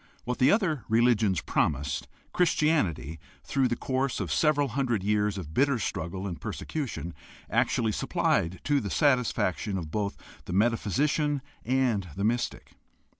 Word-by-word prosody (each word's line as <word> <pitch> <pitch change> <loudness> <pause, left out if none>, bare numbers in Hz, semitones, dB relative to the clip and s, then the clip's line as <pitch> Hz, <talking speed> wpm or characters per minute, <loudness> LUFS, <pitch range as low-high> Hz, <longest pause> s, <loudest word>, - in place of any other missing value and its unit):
What 125 +1 -3
the 130 - +5
other 175 - +1
religions 110 -5 +3
promised, 70 -1 -1 0.3
Christianity, 100 - +1 0.2
through 135 -2 +1
the 120 - -1
course 130 +2 -1
of - - -3
several 145 -2 +2
hundred 120 -5 0
years 105 0 +1
of 80 -5 -7
bitter 140 - +3
struggle 95 -2 -3
and 85 -6 -5
persecution, 125 - -4 0.4
actually 110 -2 +2
supplied 90 -3 0
to 145 -1 +2
the 105 -6 -4
satisfaction 110 - +1
of 80 -4 -5
both 100 +1 -2 0.3
the - - -5
metaphysician 130 - +1 0.2
and 125 -6 +1
the 100 - -3
mystic. 120 +3 -1
115 Hz, 135 wpm, -28 LUFS, 95-135 Hz, 0.4 s, the